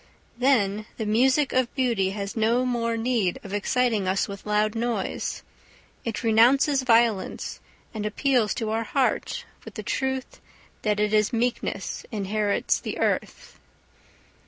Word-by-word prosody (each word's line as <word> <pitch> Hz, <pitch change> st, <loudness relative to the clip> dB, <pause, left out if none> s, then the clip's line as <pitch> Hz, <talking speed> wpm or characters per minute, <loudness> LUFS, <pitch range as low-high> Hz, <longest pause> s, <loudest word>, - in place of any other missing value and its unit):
Then 215 Hz, -5 st, +2 dB
the 220 Hz, -, -3 dB
music 260 Hz, +6 st, +3 dB
of 255 Hz, -2 st, +1 dB
beauty 235 Hz, -8 st, +1 dB
has 200 Hz, 0 st, -5 dB
no 230 Hz, +3 st, +2 dB
more 230 Hz, -2 st, 0 dB
need 225 Hz, -6 st, 0 dB
of 195 Hz, -, -8 dB
exciting 215 Hz, -1 st, +1 dB
us 190 Hz, +1 st, +1 dB
with 200 Hz, +1 st, -9 dB
loud 210 Hz, 0 st, +2 dB
noise; 230 Hz, -3 st, -2 dB, 0.6 s
it 230 Hz, +1 st, -4 dB
renounces 255 Hz, +5 st, +4 dB
violence, 230 Hz, -5 st, +1 dB, 0.3 s
and 215 Hz, -2 st, -4 dB
appeals 225 Hz, 0 st, +1 dB
to 220 Hz, -4 st, -2 dB
our 225 Hz, +1 st, 0 dB
heart 260 Hz, +3 st, -1 dB, 0.2 s
with -, -, -11 dB
the -, -, -5 dB
truth 265 Hz, -1 st, -3 dB, 0.4 s
that 210 Hz, -1 st, 0 dB
it 210 Hz, 0 st, +1 dB
is 210 Hz, -1 st, +3 dB
meekness 240 Hz, +1 st, -2 dB
inherits 205 Hz, -1 st, 0 dB
the -, -, -5 dB
earth. -, -, -2 dB
225 Hz, 135 wpm, -25 LUFS, 210-250 Hz, 0.6 s, renounces